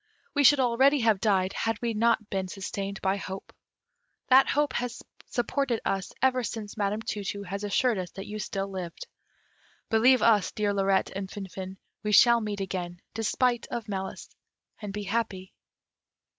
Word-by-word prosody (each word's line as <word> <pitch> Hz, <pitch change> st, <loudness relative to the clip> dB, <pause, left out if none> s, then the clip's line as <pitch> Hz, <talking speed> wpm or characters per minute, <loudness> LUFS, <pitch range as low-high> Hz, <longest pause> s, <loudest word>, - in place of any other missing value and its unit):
We 290 Hz, -, +2 dB
should 285 Hz, +1 st, +7 dB
already 265 Hz, +3 st, +4 dB
have 220 Hz, -3 st, +3 dB
died, 190 Hz, -3 st, +2 dB
had 225 Hz, -1 st, -1 dB
we 235 Hz, -1 st, -1 dB
not 225 Hz, -1 st, +2 dB
been 190 Hz, -1 st, -1 dB
sustained 195 Hz, +1 st, -5 dB
by 190 Hz, +1 st, +2 dB
hope. 190 Hz, -1 st, -7 dB, 0.8 s
That 265 Hz, +1 st, +7 dB
hope 290 Hz, -2 st, +1 dB
has 245 Hz, -1 st, -3 dB, 0.2 s
supported 245 Hz, -1 st, 0 dB
us 195 Hz, 0 st, -1 dB
ever 255 Hz, -1 st, +3 dB
since 215 Hz, -2 st, -5 dB
Madam 210 Hz, +1 st, -1 dB
Tu 205 Hz, -2 st, -3 dB
tu 200 Hz, +1 st, -4 dB
has 200 Hz, +1 st, -5 dB
assured 220 Hz, +1 st, +1 dB
us 180 Hz, -1 st, -4 dB
that 195 Hz, +1 st, -7 dB
you 215 Hz, +1 st, -6 dB
still 195 Hz, -1 st, -3 dB
lived. 185 Hz, -, -6 dB, 0.9 s
Believe 250 Hz, +4 st, +5 dB
us, 215 Hz, -4 st, +4 dB
dear 205 Hz, -1 st, 0 dB
Lirette 195 Hz, -1 st, +1 dB
and 195 Hz, -1 st, -4 dB
Finfin, 190 Hz, -1 st, -7 dB, 0.2 s
we 210 Hz, -, -2 dB
shall 235 Hz, +2 st, +7 dB
meet 205 Hz, -2 st, -3 dB
again, 180 Hz, -2 st, -4 dB
despite 240 Hz, +2 st, 0 dB
of 230 Hz, -2 st, -5 dB
malice, 190 Hz, -2 st, -5 dB, 0.5 s
and 205 Hz, -2 st, -5 dB
be 205 Hz, +1 st, -4 dB
happy." 200 Hz, -3 st, -3 dB
210 Hz, 165 wpm, -28 LUFS, 195-235 Hz, 0.9 s, should